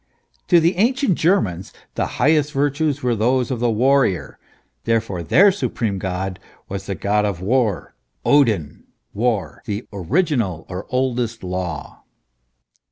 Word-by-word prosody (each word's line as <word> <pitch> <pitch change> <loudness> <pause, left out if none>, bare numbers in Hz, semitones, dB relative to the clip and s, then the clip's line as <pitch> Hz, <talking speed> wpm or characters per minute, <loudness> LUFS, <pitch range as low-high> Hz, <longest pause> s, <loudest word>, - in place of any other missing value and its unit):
To 175 - +6
the 170 +2 +1
ancient 250 +2 +2
Germans 155 - 0 0.2
the - - -1
highest 150 -1 +2
virtues 145 0 0
were 125 -2 +1
those 125 +4 +1
of 125 - -2
the 120 0 +1
warrior; 115 - +1 0.5
therefore, 115 -6 0
their 195 - +5
supreme 115 - -2
god 95 0 -3 0.3
was 95 0 -6
the 100 - -2
god 105 +4 +1
of 100 -4 -2
war, 110 0 0 0.3
Odin, 110 - +2 0.3
war, 110 -2 -1
" - - -38
the 105 +2 -3
original 105 - 0
or 90 +1 -6
oldest 125 -3 -1
law." 90 -4 -5
115 Hz, 135 wpm, -21 LUFS, 95-140 Hz, 0.5 s, To